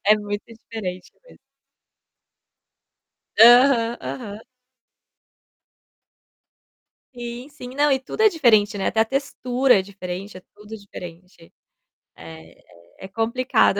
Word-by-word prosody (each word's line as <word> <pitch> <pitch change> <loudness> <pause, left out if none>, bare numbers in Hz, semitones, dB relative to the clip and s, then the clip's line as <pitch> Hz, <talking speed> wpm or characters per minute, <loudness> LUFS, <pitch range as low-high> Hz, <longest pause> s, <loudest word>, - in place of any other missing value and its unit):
É 210 +1 +5
muito 205 0 -5
diferente 220 -6 -8 0.2
mesmo. - - -18 2.0
Aham, 240 0 +6
aham. 210 -5 -7 2.8
Sim, 240 +2 -8
sim. 265 -3 -10
Não, 290 0 +2
e 265 - +2
tudo 435 +11 -4
é 435 - +7
diferente, 220 - +3
né, 195 - -2
até 220 - +1
a - - +5
textura 260 0 0
é - - -1
diferente, 190 0 -8
é - - -16
tudo 210 +1 -12
diferente. 180 -4 -12 0.6
É, 80 0 -13 0.5
é, - - -7
é - - -8
complicado. 225 0 +1
220 Hz, 115 wpm, -22 LUFS, 195-250 Hz, 2.8 s, é